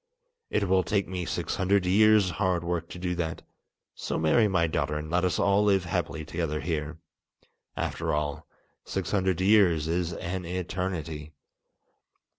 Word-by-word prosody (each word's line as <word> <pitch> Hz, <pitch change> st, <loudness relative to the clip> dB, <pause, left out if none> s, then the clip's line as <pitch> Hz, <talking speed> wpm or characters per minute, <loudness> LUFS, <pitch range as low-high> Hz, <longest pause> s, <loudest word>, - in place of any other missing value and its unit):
It 100 Hz, -, 0 dB
will 95 Hz, 0 st, +4 dB
take 100 Hz, +3 st, 0 dB
me 90 Hz, -2 st, -4 dB
six -, -, -2 dB
hundred 95 Hz, 0 st, +2 dB
years' 105 Hz, 0 st, +5 dB
hard 90 Hz, -1 st, 0 dB
work 85 Hz, -1 st, -2 dB
to -, -, -8 dB
do 90 Hz, 0 st, -2 dB
that; 80 Hz, -2 st, -3 dB, 0.5 s
so -, -, -3 dB
marry 80 Hz, +8 st, +3 dB
my 90 Hz, -4 st, +2 dB
daughter 75 Hz, -1 st, -1 dB
and 75 Hz, +1 st, -6 dB
let 90 Hz, +1 st, +2 dB
us 90 Hz, -, +1 dB
all 100 Hz, +1 st, +3 dB
live 95 Hz, -3 st, +3 dB
happily 80 Hz, -2 st, -2 dB
together 80 Hz, -1 st, -2 dB
here. 80 Hz, -1 st, -3 dB, 0.8 s
After -, -, -2 dB
all, 75 Hz, 0 st, -2 dB, 0.4 s
six 95 Hz, -3 st, -3 dB
hundred 95 Hz, -3 st, +1 dB
years 95 Hz, -6 st, +4 dB
is 85 Hz, +1 st, -1 dB
an 90 Hz, +2 st, -4 dB
eternity!" 85 Hz, -4 st, -4 dB
90 Hz, 155 wpm, -27 LUFS, 80-95 Hz, 0.8 s, years